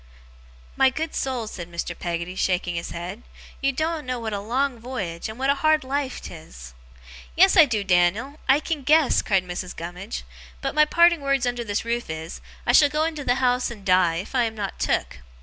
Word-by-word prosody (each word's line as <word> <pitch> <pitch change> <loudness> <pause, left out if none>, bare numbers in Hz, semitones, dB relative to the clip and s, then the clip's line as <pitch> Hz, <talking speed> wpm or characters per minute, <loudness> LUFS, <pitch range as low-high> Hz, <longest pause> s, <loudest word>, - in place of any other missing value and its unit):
'My 265 - +5
good 315 +4 -4
soul,' 255 -4 -2
said 175 -5 -8
Mr. 170 0 -4
Peggotty, 170 +1 -4
shaking 180 -1 0
his 170 0 -4
head, 180 +6 -6 0.4
'you 275 0 +2
doen't 315 +1 -2
know 255 -1 -2
what 225 -2 -4
a 200 - -2
long 245 +4 -1
voyage, 205 -8 -5
and 220 - -8
what 270 +2 +2
a 280 - -2
hard 310 -1 +3
life 270 0 -2
'tis!' 60 - -11 0.6
'Yes, 380 +3 +6
I 330 -5 +9
do, 220 -7 -1
Dan'l! 195 - +1
I 270 +2 +6
can 310 -2 -3
guess!' 305 +2 +4
cried 190 -3 +1
Mrs. 180 0 -5
Gummidge. 175 +5 -6 0.4
'But 270 - -3
my 305 +1 +5
parting 340 +1 +4
words 275 -2 +1
under 245 -1 -1
this 205 0 -2
roof 235 -2 -2
is, 160 +1 -6 0.2
I - - +3
shall 290 -2 +6
go 300 +2 0
into 315 -2 -2
the 245 - +2
house 250 -1 +1
and 210 -5 -10
die, 180 -3 +4
if 185 +9 -5
I 250 -2 +3
am 225 -1 -4
not 205 -2 -5
took. - - -1
240 Hz, 205 wpm, -24 LUFS, 180-275 Hz, 0.6 s, I